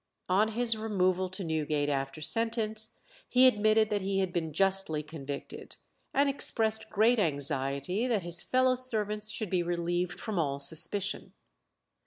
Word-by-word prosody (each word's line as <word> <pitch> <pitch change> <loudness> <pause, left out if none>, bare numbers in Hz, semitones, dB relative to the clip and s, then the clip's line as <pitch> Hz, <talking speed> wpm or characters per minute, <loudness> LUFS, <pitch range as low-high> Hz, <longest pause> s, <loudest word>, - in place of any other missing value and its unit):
On 200 +4 +3
his 235 0 +3
removal 185 -4 0
to 185 +1 -7
Newgate 155 -3 -1
after 135 +1 -3
sentence, 220 +3 0 0.3
he 250 +1 +5
admitted 215 -2 +3
that 205 -1 0
he 195 +1 -2
had 190 -2 -1
been 165 -3 -2
justly 190 -3 +1
convicted, 145 -2 -8 0.4
and 280 +1 +2
expressed 220 -5 +1
great 225 +3 +3
anxiety 140 - 0
that 220 -7 0
his 175 0 +5
fellow 255 0 +2
servants 215 -4 -2
should 215 -2 -4
be 180 -2 +1
relieved 175 +1 -2
from 215 -5 -3
all 140 -3 -1
suspicion. 170 +7 0
195 Hz, 145 wpm, -29 LUFS, 160-220 Hz, 0.4 s, he